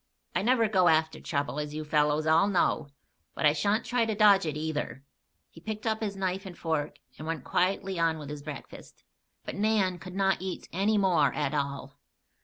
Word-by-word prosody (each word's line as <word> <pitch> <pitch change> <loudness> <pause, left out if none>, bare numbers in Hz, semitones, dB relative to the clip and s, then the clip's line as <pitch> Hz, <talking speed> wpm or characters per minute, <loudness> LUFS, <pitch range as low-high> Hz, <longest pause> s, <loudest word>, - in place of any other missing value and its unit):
I - - +1
never 230 +1 +3
go 190 -4 +3
after 160 -1 +2
trouble, 145 -1 -2
as 150 0 -4
you 155 0 -4
fellows 150 0 +2
all 160 +5 +4
know; 175 -6 +1 0.5
but - - -1
I 150 - +6
sha'n't 205 +8 0
try 245 -1 +1
to 220 - -1
dodge 200 -4 +5
it, 150 -1 -3
either." 150 -3 -3 0.5
He 165 - -15
picked 215 +3 -5
up 220 0 0
his 205 -2 -2
knife 190 0 -2
and 175 - -10
fork 155 -3 -2 0.2
and 155 - -7
went 160 -5 -3
quietly 190 0 0
on 165 -1 +2
with 150 -2 -8
his 150 -1 -6
breakfast. 145 -2 -10 0.4
But - - -5
Nan 200 -4 +1
could 180 +2 -9
not 195 -2 +1
eat 185 -1 -5
any 200 +4 +2
more 175 -9 +3
at 135 - -1
all. 140 -1 -3
170 Hz, 200 wpm, -28 LUFS, 150-200 Hz, 0.5 s, I